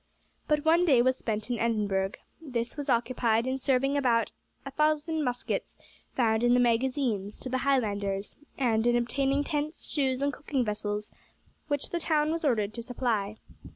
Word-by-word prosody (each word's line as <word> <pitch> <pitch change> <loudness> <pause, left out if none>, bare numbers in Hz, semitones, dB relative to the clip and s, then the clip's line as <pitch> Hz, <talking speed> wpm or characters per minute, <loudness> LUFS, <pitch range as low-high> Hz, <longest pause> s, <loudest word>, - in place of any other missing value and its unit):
But 300 0 +1
one 335 +2 +5
day 265 -9 +5
was 260 +1 +3
spent 215 +1 -3
in 240 - -1
Edinburgh. 205 -4 0 0.3
This 245 -6 -3
was 290 -1 -5
occupied 235 -1 +2
in 260 +1 -1
serving 270 +1 +2
out 285 - +1
about 230 -4 +2 0.3
a 275 - -6
thousand 305 +2 +1
muskets 245 -2 -3 0.4
found 220 -3 +2
in 240 0 +5
the - - +4
magazines 240 -4 0
to 260 - -7
the 260 +1 0
Highlanders, 205 -7 0 0.2
and 230 -3 +2
in 240 - +4
obtaining 275 +4 +1
tents, 300 +2 -3
shoes, 270 -3 0
and 285 0 +1
cooking 275 -4 -2
vessels, 210 0 -3 0.6
which 290 -2 -2
the 345 - -1
town 310 -1 +2
was 330 0 -2
ordered 215 -7 +1
to 235 - -5
supply. 230 -4 -2
250 Hz, 170 wpm, -28 LUFS, 225-285 Hz, 0.6 s, one